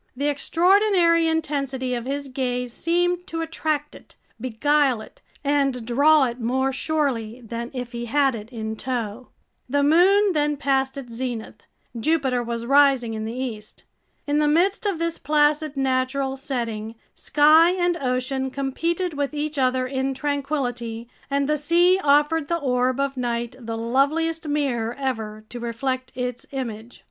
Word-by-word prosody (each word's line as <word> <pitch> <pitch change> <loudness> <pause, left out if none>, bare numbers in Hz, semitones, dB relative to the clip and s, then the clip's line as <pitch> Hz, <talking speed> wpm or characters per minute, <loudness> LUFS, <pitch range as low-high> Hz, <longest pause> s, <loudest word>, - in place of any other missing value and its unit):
The 285 +2 +1
extraordinary 340 +2 +3
intensity 275 -5 -1
of 240 -1 -3
his 280 +1 -3
gaze 250 -2 -2
seemed 350 +3 0
to 330 0 -3
attract 310 -2 -2
it, - - -16 0.2
beguile 260 +2 +2
it, 215 - -13 0.2
and 275 -4 +1
draw 285 +5 +5
it 240 0 -4
more 265 +3 0
surely 255 -6 -1
than 235 +1 -5
if 250 -2 -5
he 240 -1 -5
had 275 +2 +2
it 220 -1 -7
in 220 -2 -4
tow! 240 -1 -4 0.4
The 285 +2 +2
moon 375 +6 +5
then 295 -1 +1
passed 270 -1 0
its 245 -4 -8
zenith. 230 -3 -5 0.3
Jupiter 265 -1 +1
was 235 0 -4
rising 270 -3 +4
in 220 0 -4
the 225 +2 -5
east. 230 -5 -6 0.4
In 290 0 +1
the 300 - +3
midst 375 +8 +2
of 390 -4 0
this 335 0 -2
placid 300 0 +1
natural 265 0 0
setting, 230 -5 -4 0.2
sky 310 +3 +5
and 350 -1 +1
ocean 265 -1 -1
competed 330 +7 -2
with 285 0 -2
each 295 0 -2
other 255 0 +2
in 265 +1 -2
tranquility, 255 -5 -3 0.2
and 280 0 +1
the 300 0 +1
sea 345 +5 +3
offered 295 +2 +3
the 340 - 0
orb 255 -3 0
of 275 -1 -1
night 240 -1 -2
the 225 -2 -5
loveliest 305 +8 0
mirror 250 -6 -1
ever 220 -5 -4
to 245 - -7
reflect 255 +2 -3
its 250 -1 -4
image. 235 -4 -6
270 Hz, 155 wpm, -23 LUFS, 245-300 Hz, 0.4 s, draw